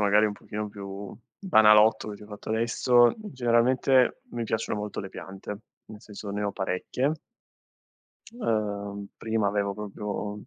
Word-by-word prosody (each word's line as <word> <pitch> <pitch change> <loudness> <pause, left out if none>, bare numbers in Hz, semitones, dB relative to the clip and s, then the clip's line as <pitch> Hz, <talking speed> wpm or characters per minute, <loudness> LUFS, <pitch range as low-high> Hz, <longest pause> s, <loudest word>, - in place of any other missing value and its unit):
magari 105 +1 +4
un 105 - -2
pochino 105 +1 -6
più 100 -1 -8 0.2
banalotto, 110 - +5
che 105 - -6
ti - - -15
ho - - -14
fatto 105 0 -10
adesso, 120 +2 +4
generalmente 130 - +2
mi 120 -1 -3
piacciono 110 -1 -2
molto 105 0 -5
le 95 - -4
piante, 95 +2 -8 0.3
nel 110 -1 -11
senso, 105 -1 -8
ne 105 +1 -3
ho 100 - 0
parecchie 100 +10 -1 1.3
ehm, 100 - -2
prima 110 -2 0
avevo 100 0 -1
proprio, 105 0 -5
mhmm 105 - -11
105 Hz, 150 wpm, -27 LUFS, 100-115 Hz, 1.3 s, banalotto